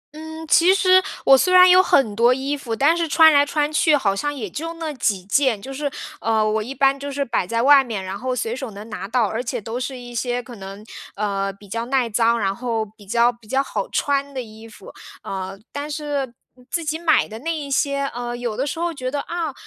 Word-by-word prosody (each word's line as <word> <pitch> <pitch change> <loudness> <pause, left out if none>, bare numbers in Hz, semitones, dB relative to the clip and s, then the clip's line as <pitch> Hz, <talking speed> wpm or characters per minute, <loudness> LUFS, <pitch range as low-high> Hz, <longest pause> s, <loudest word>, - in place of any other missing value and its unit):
嗯， 315 +1 -8
其 345 +5 +5
实 370 -1 +5 0.2
我 270 - +8
虽 365 +7 +2
然 365 0 +8
有 365 +1 +7
很 230 - +2
多 235 +3 +4
衣 275 +2 -2
服， 240 -5 -5
但 290 +8 +3
是 335 -1 -1
穿 320 0 +6
来 285 0 +6
穿 295 +1 -1
去 305 0 +4
好 195 -7 0
像 290 +8 -2
也 255 -7 -5
就 325 - -5
那 320 -2 -5
几 205 -7 -1
件， 235 +1 +2
就 270 +6 -8
是， 285 +1 -3 0.3
呃， 220 -1 +1
我 215 0 0
一 250 +5 -6
般 275 +1 +2
就 285 0 -5
是 280 0 -2
摆 230 -7 -1
在 230 +3 0
外 275 0 +7
面， 215 -6 -5
然 190 +1 -6
后 255 0 -2
随 230 -1 -2
手 265 -2 -6
能 205 +2 -10
拿 200 -2 -5
到， 235 +1 +1
而 225 +4 -3
且 245 0 -3
都 225 +4 -5
是 255 +1 -4
一 245 -1 -10
些 245 +1 -1
可 240 0 -11
能， 195 +2 -10 0.3
呃， 195 -1 -2
比 200 +1 -17
较 230 +4 -3
耐 260 -2 +1
脏， 230 +1 +2
然 195 -1 -1
后 230 -3 -2
比 205 -1 -18
较 235 +3 +3
比 235 -2 -21
较 265 +4 +1
好 205 -7 -4
穿 280 -1 -1
的 260 - -2
衣 220 0 -13
服。 435 - -14 0.3
呃， 190 0 -5
但 290 +1 -5
是 290 -4 -3 0.4
自 335 -2 -2
己 315 +2 -2
买 325 -2 +3
的 220 +1 -9
那 330 +4 -2
一 285 -2 -6
些， 280 0 +1
呃， 240 0 -4
有 240 -3 -3
的 270 +3 -2
时 325 - -4
候 340 0 -1
觉 255 -3 -4
得， 285 +1 -2
啊， 335 -4 -4
255 Hz, 260 characters per minute, -21 LUFS, 220-290 Hz, 0.4 s, 我